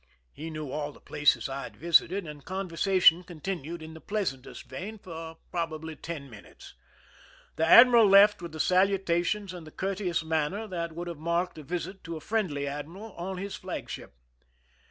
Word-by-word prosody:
He 160 +2 -7
knew 155 -3 -6
all 150 0 -3
the - - -17
places 150 0 +2
I 135 0 -4
had - - -9
visited, 170 +3 +3
and 150 -2 -9
conversation 185 -1 +3
con 175 -2 -11
tinued 170 -2 -4
in 160 0 -9
the 160 - -11
pleasantest 185 -12 -3
vein 215 +4 -6
for 165 -4 -8
probably 160 -2 -3
ten 155 -4 -7
minutes. 110 -6 -14 0.8
The 160 - +1
admiral 235 +2 +9
left 200 0 +7
with 170 -2 -6
the 155 - -8
salutations 190 +1 +2
and 170 -3 -9
the - - -11
courteous 190 -3 -2
manner 160 +6 -1
that 170 -5 -4
would 175 +2 -5
have 170 -3 -6
marked 170 +1 -1
a - - -9
visit 180 +5 -5
to 165 -1 -5
a - - -7
friendly 160 -7 -1
admiral 160 +10 -6
on 185 +2 -5
his 200 +2 -5
flagship. 65 - -7
170 Hz, 175 wpm, -28 LUFS, 155-190 Hz, 0.8 s, admiral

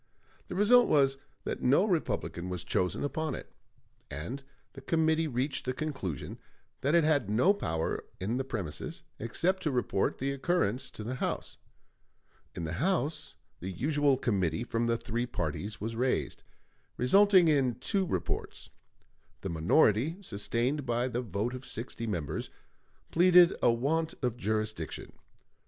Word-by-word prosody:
The - - -6
result 235 +5 +6
was 135 -2 +3 0.2
that - - -4
no 140 +10 +4
Republican 155 - -1
was 90 -1 -3
chosen 90 -1 0
upon 155 +2 -2
it; - - -9 0.6
and 85 - -5 0.3
the 135 - -10
committee 160 +2 +2
reached 135 +1 -1
the 130 - -1
conclusion 130 - -4 0.4
that 140 +5 +2
it 170 - +5
had 145 -9 +2
no 125 - +4
power 80 - -2 0.2
in 105 +7 -1
the 135 - 0
premises, 120 - -5 0.2
except 180 - 0
to 155 - 0
report 125 -7 0
the 135 +1 -1
occurrence 135 - 0
to 110 - -9
the 120 +4 -3
House. - - -2 1.0
In - - -4
the 80 0 -3
House 155 -4 0 0.2
the 95 - -5
usual 140 - +2
committee 100 -4 0
from 115 -1 -1
the 115 0 +2
three 120 +2 -3
parties 100 +2 -4
was 115 +2 -4
raised, 125 +2 -1 0.6
resulting 190 +7 +6
in 135 -6 +3
two 195 - 0
reports. 90 - -3 0.7
The 95 - -4
minority, 105 - +3
sustained 120 - -1
by 120 0 0
the 120 +1 -2
vote 110 +2 -2
of 130 0 -7
sixty 115 -1 -5
members, 85 -9 -3 0.6
pleaded 175 0 +7
a 120 - +5
want 155 +7 0
of 125 -2 0
jurisdiction. 110 -6 -3
125 Hz, 145 wpm, -30 LUFS, 110-155 Hz, 1.0 s, pleaded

